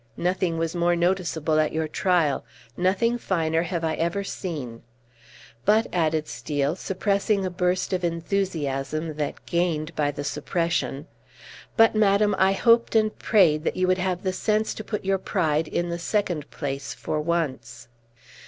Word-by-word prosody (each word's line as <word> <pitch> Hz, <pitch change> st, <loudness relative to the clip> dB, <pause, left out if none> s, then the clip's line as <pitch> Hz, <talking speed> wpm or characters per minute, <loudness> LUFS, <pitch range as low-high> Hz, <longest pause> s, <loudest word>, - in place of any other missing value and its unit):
Nothing 180 Hz, -1 st, 0 dB
was 165 Hz, +1 st, -2 dB
more 175 Hz, 0 st, +2 dB
noticeable 170 Hz, -3 st, +1 dB
at 155 Hz, -, +1 dB
your 160 Hz, 0 st, -1 dB
trial; 165 Hz, -3 st, +1 dB, 0.3 s
nothing 215 Hz, +7 st, +1 dB
finer 165 Hz, -6 st, 0 dB
have 170 Hz, -1 st, -3 dB
I 160 Hz, -1 st, 0 dB
ever 170 Hz, +5 st, -1 dB
seen! 145 Hz, -, -5 dB, 0.8 s
But," 215 Hz, +3 st, +4 dB
added 155 Hz, -3 st, +1 dB
Steel, 145 Hz, +1 st, -2 dB
suppressing 200 Hz, +1 st, 0 dB
a 185 Hz, -, -2 dB
burst 180 Hz, +1 st, 0 dB
of 180 Hz, -1 st, -1 dB
enthusiasm 165 Hz, -4 st, -2 dB
that 150 Hz, -2 st, -4 dB
gained 170 Hz, -2 st, -1 dB
by 145 Hz, -1 st, +1 dB
the 145 Hz, 0 st, -5 dB
suppression, 150 Hz, -2 st, -1 dB, 0.7 s
"but, 225 Hz, -1 st, +6 dB
madam, 210 Hz, -1 st, +3 dB
I 190 Hz, +1 st, +4 dB
hoped 230 Hz, +3 st, +3 dB
and 215 Hz, -1 st, +3 dB
prayed 165 Hz, -9 st, +4 dB
that -, -, -1 dB
you 185 Hz, 0 st, +2 dB
would 185 Hz, 0 st, +2 dB
have 180 Hz, -1 st, -1 dB
the 185 Hz, -1 st, 0 dB
sense 215 Hz, +3 st, 0 dB
to 215 Hz, -, -7 dB
put 210 Hz, -2 st, -4 dB
your 195 Hz, 0 st, +1 dB
pride 160 Hz, -5 st, 0 dB
in 175 Hz, +2 st, -2 dB
the 170 Hz, 0 st, -3 dB
second 175 Hz, -5 st, -1 dB
place 140 Hz, -2 st, -4 dB
for 155 Hz, -, -2 dB
once." 130 Hz, -7 st, -3 dB
170 Hz, 155 wpm, -25 LUFS, 155-190 Hz, 0.8 s, but